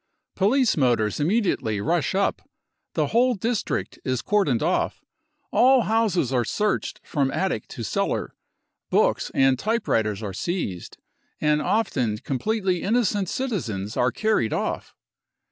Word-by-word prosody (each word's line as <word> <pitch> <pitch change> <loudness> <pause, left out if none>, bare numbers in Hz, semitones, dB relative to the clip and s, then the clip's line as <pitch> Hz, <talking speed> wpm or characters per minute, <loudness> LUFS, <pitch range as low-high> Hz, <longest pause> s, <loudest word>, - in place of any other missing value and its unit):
Police 235 +5 +3
motors 120 -7 +1
imme 200 +10 +2
diately 110 - -1
rush 170 +3 +1
up, 200 +1 +1 0.5
the - - +2
whole 245 +2 +4
district 225 +2 -2
is 130 -2 -1
cordoned 180 - +1
off, 175 +3 0 0.5
all 260 +1 +5
houses 205 - +1
are 125 -2 +2
searched 210 - -1
ffom 140 -3 0
attic 185 - -1
to 115 - -7
cellar, 95 - -1 0.6
books - - +2
and 135 -1 +4
type 225 +6 -1
writers 110 -1 0
are 100 -2 -4
seized, 100 - -4 0.4
and 150 0 +2
often 130 - 0
completely 185 - -1
innocent 205 -4 +1
citizens 115 - -3
are 125 0 +2
carried 215 - +1
off. - - -3
170 Hz, 130 wpm, -24 LUFS, -, 0.6 s, all